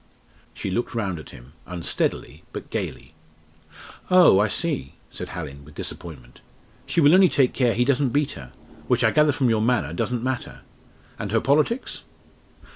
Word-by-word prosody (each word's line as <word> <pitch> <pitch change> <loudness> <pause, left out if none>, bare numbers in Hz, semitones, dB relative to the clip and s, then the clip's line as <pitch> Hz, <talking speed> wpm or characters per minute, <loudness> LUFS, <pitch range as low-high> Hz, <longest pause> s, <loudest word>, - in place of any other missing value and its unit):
'" - - -31
She 95 - -4
looked 120 +4 -2
round 95 -7 -2
at 75 - -11
him, 60 +3 -14
unsteadily, 90 -2 -3
but - - -8
gaily. - - -5 1.0
"Oh! 180 - +7
I 105 - +3
see," 110 - -1 0.2
said - - -7
Hallin, 70 -5 -7
with 75 +1 -16
disappointment, 65 -8 -7 0.5
"she - - 0
will 145 0 +6
only 185 -1 +7
take 135 -4 +2
care 125 -3 +1
he 125 - +2
doesn't 140 0 +2
beat 145 +3 0
her 65 -3 -10 0.4
which - - +2
I - - +4
gather 150 -1 +4
from 130 -3 +1
your 110 -1 +1
manner 115 -8 +1
doesn't 120 +7 -2
matter. 130 -1 -4 0.6
And 100 - -4
her 115 - +3
politics?" 150 - 0
120 Hz, 170 wpm, -24 LUFS, 85-140 Hz, 1.0 s, Oh